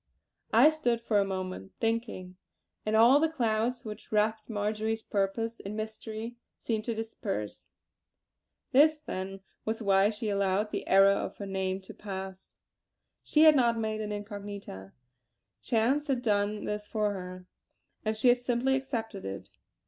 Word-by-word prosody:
I 310 - +7
stood 245 -7 0
for 220 -3 +1
a - - +4
moment 185 - -5
thinking, 225 -5 -2 0.5
and 215 - +2
all 240 +6 +7
the 320 +1 +2
clouds 235 -4 0
which 210 -1 -8
wrapped 215 +1 +1
Marjory's 220 +1 -1
purpose 225 +3 -1
in 200 +2 -6
mystery 220 +1 -6 0.2
seemed 220 -2 -2
to 230 - -2
disperse. 210 - -4 1.0
This, 305 +3 +5
then, 195 -6 -5 0.2
was 220 +1 -2
why 195 0 +4
she 220 +1 -4
allowed 200 +1 +1
the - - -4
error 195 +1 +7
of 200 - -2
her 200 - -5
name 190 0 -2
to 190 - -11
pass. 190 -2 -8 0.6
She 305 - +3
had 310 -1 +8
not 235 -3 +3
made 215 -1 -2
an 210 -1 -4
incognita; 205 - -7 0.7
chance 255 +6 +1
had 260 -3 0
done 210 -1 +1
this 210 0 -3
for 210 -1 0
her, 185 -1 -7 0.6
and 215 0 -1
she 245 +3 +4
had 245 0 +5
simply 245 +2 +1
accepted 225 -6 -3
it. 95 0 -6
215 Hz, 150 wpm, -30 LUFS, 195-230 Hz, 1.0 s, had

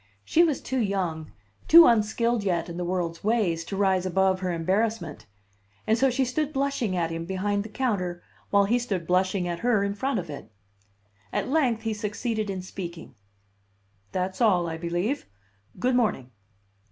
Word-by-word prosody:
She 335 - +4
was 310 -5 +1
too 260 - -2
young, 180 -7 -2 0.4
too 335 +1 +10
unskilled 230 0 +2
yet 175 -3 -1
in 170 - -6
the 180 - -2
world's 175 -2 -2
ways, 200 -7 +1
to 195 - -5
rise 190 -2 +2
above 185 +1 +2
her 185 -1 -2
embarrassment; 175 - -1 0.6
and 220 - +3
so 270 +3 +3
she 260 +1 +1
stood 295 +4 -1
blushing 275 -8 -1
at 165 -2 -1
him 165 0 -4
behind 195 +3 -1
the 215 - -7
counter, 195 -9 -2 0.3
while 200 0 +4
he 235 +5 +2
stood 200 -8 -3
blushing 185 +1 +1
at 170 -1 -3
her 230 -3 +2
in 200 0 -1
front 260 +5 -1
of 175 -4 -3
it. 145 -6 -9 0.8
At - - -2
length 255 -7 +1
he 225 -1 -1
succeeded 215 0 -3
in 190 -2 -4
speaking. 175 -5 -8 1.0
"That's 185 +2 -3
all, 185 -7 +3
I 165 - -3
believe. 175 - -2 0.5
Good 255 0 +1
morning." 210 - 0
200 Hz, 170 wpm, -26 LUFS, 175-235 Hz, 1.0 s, too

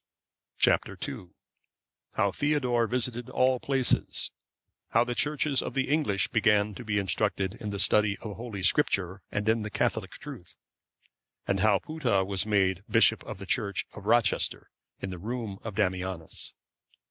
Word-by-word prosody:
Chap. - - +4 0.2
II. 90 - -7 0.9
How 100 0 +2
Theodore 125 -3 +1
visited 120 0 -2
all 130 0 +2
places; 135 -1 +1 0.6
how 115 - +4
the 120 0 -3
Churches 145 +1 +1
of - - -5
the 135 -1 0
English 140 - +1
began 105 -1 +3
to 125 - -8
be 105 -2 -1
instructed 100 -1 0
in 105 - -4
the 100 - -3
study 105 0 +3
of 105 -3 -7
Holy 110 -5 -6
Scripture, 95 -5 +2
and 105 +1 -2
in 110 0 +3
the 105 - -4
Catholic - - -1
truth; - - -9 0.9
and 95 - +1
how 105 0 +4
Putta 120 -9 0
was 100 +1 -1
made 95 -3 +2
bishop 115 0 +4
of 110 - -6
the 100 - -8
Church 100 0 0
of 105 -1 -10
Rochester 115 -3 +2 0.3
in 95 - -4
the 90 - -6
room 110 -1 -4
of 110 -3 -6
Damianus. 95 -5 -2
105 Hz, 155 wpm, -28 LUFS, 100-120 Hz, 0.9 s, Chap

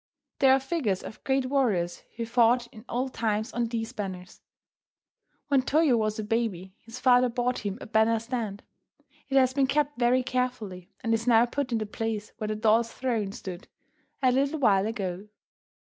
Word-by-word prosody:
There 265 -1 +6
are 265 - +5
figures 270 - -1
of - - -10
great 265 -1 +1
warriors 220 -11 0
who 230 0 -3
fought 240 +1 +3
in 220 +1 -13
olden 255 +2 -2
times 220 +1 -1
on 235 0 0
these 225 0 -4
banners. 190 -5 -7 1.1
When 280 -3 +3
Toyo 295 0 +3
was 215 -1 0
a 215 - -3
baby 210 -4 -2
his 230 +2 -10
father 250 -1 +5
bought 245 +1 -1
him 205 -1 -4
a - - -8
banner 220 0 +3
stand. 225 -3 -4 0.7
It 270 - +2
has 260 -1 +4
been 270 -1 +2
kept 290 -1 0
very 250 +1 +3
carefully, 245 -8 -3
and 230 - 0
is 225 +1 -1
now 235 -1 +6
put 255 +1 -3
in 230 - +1
the 215 - -2
place 215 0 -4
where 215 - -2
the 215 - -2
doll's 225 +2 +2
throne 230 -6 -2
stood 185 -2 -8 0.6
a 255 - +5
little 275 +4 +1
while 205 -7 +3
ago. 195 -3 -4
230 Hz, 180 wpm, -27 LUFS, 215-255 Hz, 1.1 s, There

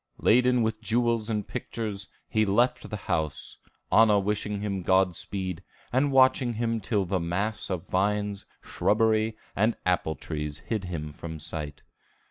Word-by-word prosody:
Laden 125 +1 +4
with 110 0 -1
jewels 115 0 +1
and 105 -2 -1
pictures, 110 -5 -4 0.2
he 110 - +2
left 110 +5 +2
the 105 - -4
house, 80 -3 -2 0.3
Anna 110 -2 +6
wishing 105 +1 -1
him 100 -2 -2
Godspeed, 95 0 0 0.3
and 135 +3 +3
watching 130 -2 +4
him 115 0 0
till 100 -1 0
the 95 +1 0
mass 95 +6 -2
of 90 -2 -3
vines, 100 +1 0 0.2
shrubbery, 110 0 +2 0.2
and 110 +3 +2
apple 90 -3 +1
trees 75 -2 -5
hid 105 +5 -3
him 75 -4 -5
from 80 +1 -7
sight. 75 -1 -5
105 Hz, 140 wpm, -27 LUFS, 90-115 Hz, 0.3 s, Anna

